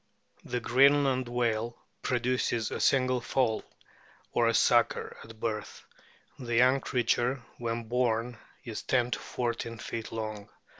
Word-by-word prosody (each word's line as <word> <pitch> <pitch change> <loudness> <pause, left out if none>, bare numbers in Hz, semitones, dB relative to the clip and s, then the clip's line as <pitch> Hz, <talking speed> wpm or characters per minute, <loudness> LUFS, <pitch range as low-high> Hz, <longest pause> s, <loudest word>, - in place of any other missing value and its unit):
The 125 - -2
Greenland 135 +1 +4
whale 120 -1 -1 0.2
produces 120 -2 0
a - - -3
single 130 -2 +3
foal 120 -3 0 0.7
or 115 -1 +3
"sucker" 120 0 +2
at 110 - -14
a 115 - -11
birth; 110 -1 -4 0.5
the 120 -3 -3
young 130 +3 +5
creature, 125 +1 0 0.2
when 115 0 -2
born, 120 0 0 0.2
is 115 -3 -5
10 125 -2 +1
to - - -1
14 115 -1 -3
feet 115 0 -5
lono 110 -2 -5
120 Hz, 130 wpm, -29 LUFS, 115-125 Hz, 0.7 s, young